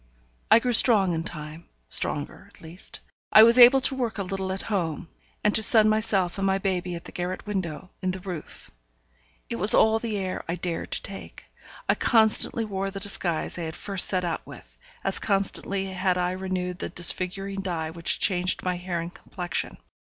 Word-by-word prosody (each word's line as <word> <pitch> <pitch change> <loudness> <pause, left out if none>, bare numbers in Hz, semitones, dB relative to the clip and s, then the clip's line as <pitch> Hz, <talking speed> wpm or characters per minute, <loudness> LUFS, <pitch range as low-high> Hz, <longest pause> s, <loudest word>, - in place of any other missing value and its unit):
I - - +7
grew 245 +1 -1
strong 205 -6 +4
in 165 0 -3
time 155 0 -8 0.2
stronger, - - -1
at - - -19
least. 165 +3 -10 0.3
I 215 - +8
was 235 +2 +6
able 250 +2 +8
to 265 - +4
work 245 -4 -3
a 200 - -3
little 190 0 -4
at 190 - -5
home, 175 -5 -4 0.3
and 210 - +2
to 220 - +2
sun 215 -1 +6
myself 205 -4 0
and 195 - 0
my 190 0 +1
baby 185 -2 -3
at 170 - -9
the - - -12
garret 180 +1 -5
window 185 -4 -5
in 185 - -2
the 185 +1 -4
roof. 180 -4 -9 0.8
It - - -5
was 205 +3 +8
all 220 0 +3
the 225 -2 -4
air 190 -1 -4
I 170 - -1
dared 175 -1 -5
to - - -3
take. 195 -1 -9 0.4
I - - +3
constantly 225 0 +2
wore 195 -2 -4
the 195 0 -7
disguise 180 -4 -1
I - - -4
had 160 0 -6
first 195 -3 +4
set 185 -2 +1
out 165 -2 -3
with; - - -15 0.3
as 195 - -1
constantly 195 -1 -2
had 185 -1 -2
I 180 0 -1
renewed 185 -1 -4
the - - -4
disfiguring 195 +3 0
dye 165 -4 -4
which 170 0 +1
changed 180 -1 +1
my 180 -1 -2
hair 175 -1 -4
and 170 +1 -8
complexion. 175 -2 -5
190 Hz, 195 wpm, -24 LUFS, 175-205 Hz, 0.8 s, I